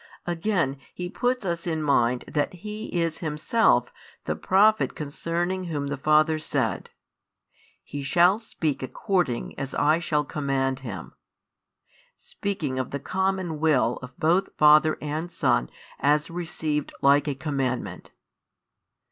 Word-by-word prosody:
Again, 170 Hz, -5 st, 0 dB, 0.2 s
He 180 Hz, 0 st, -4 dB
puts 245 Hz, -1 st, -1 dB
us 170 Hz, -1 st, -2 dB
in 160 Hz, -2 st, -1 dB
mind 125 Hz, -4 st, +2 dB
that 145 Hz, -, -1 dB
He 210 Hz, +4 st, -6 dB
is 165 Hz, -2 st, -1 dB
Himself 160 Hz, +8 st, +2 dB, 0.3 s
the -, -, -2 dB
Prophet 215 Hz, +3 st, +3 dB
concerning 170 Hz, +5 st, -2 dB
Whom 145 Hz, -4 st, -3 dB
the 145 Hz, -, -1 dB
Father 155 Hz, +2 st, +3 dB
said: 130 Hz, -, -1 dB, 0.9 s
He 145 Hz, -, -6 dB
shall 175 Hz, +8 st, +4 dB
speak 160 Hz, -10 st, -3 dB
according 140 Hz, -, -1 dB
as 135 Hz, -1 st, -4 dB
I 155 Hz, +3 st, +3 dB
shall 150 Hz, -3 st, 0 dB
command 135 Hz, -3 st, -1 dB
Him; 110 Hz, -10 st, -7 dB, 1.0 s
speaking 155 Hz, -10 st, -4 dB
of 130 Hz, -, -2 dB
the 140 Hz, -, -4 dB
common 185 Hz, -1 st, -1 dB
Will 145 Hz, -6 st, +2 dB
of 125 Hz, -1 st, -11 dB
both 175 Hz, +5 st, +2 dB
Father 155 Hz, +1 st, +6 dB
and 155 Hz, +4 st, -3 dB
Son 60 Hz, -, +1 dB, 0.3 s
as 150 Hz, +2 st, +2 dB
received 160 Hz, -3 st, -2 dB
like 140 Hz, +2 st, +5 dB
a 145 Hz, -, -1 dB
commandment. 135 Hz, -3 st, -3 dB
155 Hz, 130 wpm, -25 LUFS, 140-175 Hz, 1.0 s, Father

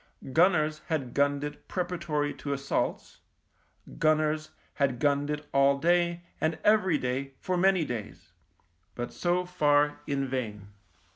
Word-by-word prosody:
Gunners 155 Hz, -2 st, +3 dB
had 140 Hz, -7 st, -2 dB
gunned 140 Hz, 0 st, +1 dB
it 150 Hz, 0 st, -7 dB
pre 180 Hz, -, -1 dB
paratory 155 Hz, -5 st, -2 dB
to 140 Hz, -, -2 dB
assaults, 140 Hz, 0 st, -2 dB, 0.8 s
gunners 155 Hz, 0 st, +2 dB, 0.2 s
had 135 Hz, -3 st, 0 dB
gunned 145 Hz, +1 st, +1 dB
it 150 Hz, 0 st, -3 dB
all 140 Hz, 0 st, +4 dB
day 175 Hz, +2 st, +1 dB, 0.2 s
and 160 Hz, 0 st, +1 dB
every 210 Hz, -6 st, +4 dB
day 135 Hz, +1 st, -3 dB
for 185 Hz, -, -2 dB
many 185 Hz, -2 st, +3 dB
days, 100 Hz, -7 st, -7 dB, 0.6 s
but 120 Hz, 0 st, -5 dB
so 180 Hz, +1 st, 0 dB
far 145 Hz, -4 st, +2 dB
in 140 Hz, -1 st, 0 dB
vain. 105 Hz, -6 st, -4 dB
150 Hz, 135 wpm, -28 LUFS, 140-170 Hz, 0.8 s, all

